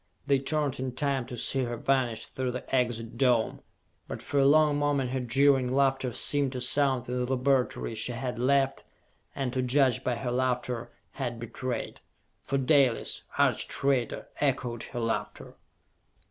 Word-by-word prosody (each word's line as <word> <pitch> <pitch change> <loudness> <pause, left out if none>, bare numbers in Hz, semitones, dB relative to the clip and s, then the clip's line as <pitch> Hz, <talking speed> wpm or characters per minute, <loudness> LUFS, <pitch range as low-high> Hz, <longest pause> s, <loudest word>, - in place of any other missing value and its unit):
They 140 -1 +3
turned 145 -1 -1
in 130 -1 -3
time 135 -3 -1
to 125 -2 -7
see 135 +3 +1
her 120 0 -4
vanish 125 -3 0
through 130 -1 -3
the 125 +1 -4
Exit 120 -2 -1
Dome; 125 -4 +2 0.5
but - - -6
for 145 - 0
a 135 - +5
long 150 0 +5
moment 140 -3 0
her 130 - -1
jeering 130 +1 +3
laughter 135 -1 +1
seemed 140 +2 +1
to 125 - -3
sound 130 -1 +1
in 125 0 -1
the 125 - -3
laboratory 130 -2 0
she 115 +3 -1
had 125 0 -4
left 135 +1 +2 0.5
and, 130 -3 -2
to 130 - 0
judge 130 0 +2
by 125 - 0
her 120 0 -3
laughter, 125 -1 -1 0.2
had 120 -4 -4
betrayed! 120 +1 -5 0.4
For 140 - -2
Dalis, 135 -2 +2 0.2
arch - - +2
traitor, 135 -4 -1
echoed 130 -4 -1
her 120 - -6
laughter! 115 -1 -3
130 Hz, 160 wpm, -28 LUFS, 125-135 Hz, 0.5 s, a